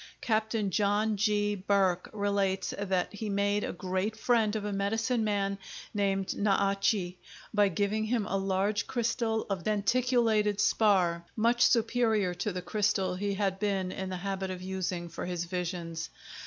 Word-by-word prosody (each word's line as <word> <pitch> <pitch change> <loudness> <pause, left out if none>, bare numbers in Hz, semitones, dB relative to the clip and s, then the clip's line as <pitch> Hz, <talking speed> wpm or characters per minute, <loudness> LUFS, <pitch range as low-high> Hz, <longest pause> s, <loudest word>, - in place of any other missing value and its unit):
Capt. 220 -1 0 0.2
John 210 +3 +2
G. 205 0 +1
Burke 190 -2 +1
relates 200 -2 0
that 190 -2 -1
he 210 +1 -4
made 200 +1 +1
a - - -2
great 185 +4 -2
friend 225 -2 +2
of 210 -1 -2
a 205 - -2
medicine 225 +4 0
man 200 -2 0 0.3
named 195 -2 0
Na 200 -1 +2
a - - -1
che 190 -3 0 0.3
by 205 -1 +4
giving 205 +3 0
him 225 -1 0
a 195 - -2
large 195 +2 0
crystal 230 -2 0
of 195 -4 -3
denticulated 215 0 +2
spar, 185 -6 +3
much 235 +2 +3
superior 225 -5 +2
to 180 +4 -2
the 180 -1 -5
crystal 200 -2 +1
he 200 +2 -2
had 195 -1 -1
been 195 -3 0
in 190 0 -4
the 185 - -3
habit 195 +1 -3
of 185 -1 -5
using 185 -2 -3
for 170 +1 -6
his 175 -1 -2
visions. 170 -2 -4
200 Hz, 160 wpm, -30 LUFS, 190-215 Hz, 0.3 s, by